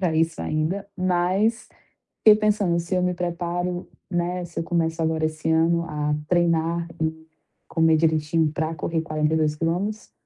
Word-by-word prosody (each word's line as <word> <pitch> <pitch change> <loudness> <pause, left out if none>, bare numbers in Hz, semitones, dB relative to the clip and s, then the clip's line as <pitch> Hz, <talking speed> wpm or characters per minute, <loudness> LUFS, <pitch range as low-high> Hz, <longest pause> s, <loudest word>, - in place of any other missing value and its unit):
para 175 -4 +1
isso 165 0 +1
ainda, 160 +6 -1
mas 185 +5 +1 0.5
fiquei 215 -1 +8
pensando 205 -5 +2
se 170 +2 -2
eu 180 - +2
me 180 0 +1
preparo, 175 0 -3 0.2
né, 175 0 -1
se 170 - -6
eu - - -1
começo 165 -1 -1
agora 160 0 +1
esse 155 0 -2
ano 165 +1 +3
a 150 -1 -1
treinar 170 -1 +1
e 160 0 -2 0.4
comer 160 -1 +3
direitinho 155 0 +2
para 160 +1 -2
correr 160 +1 -2
42 155 -1 0
quilômetros, 180 +7 -2
165 Hz, 150 wpm, -24 LUFS, 160-180 Hz, 0.5 s, fiquei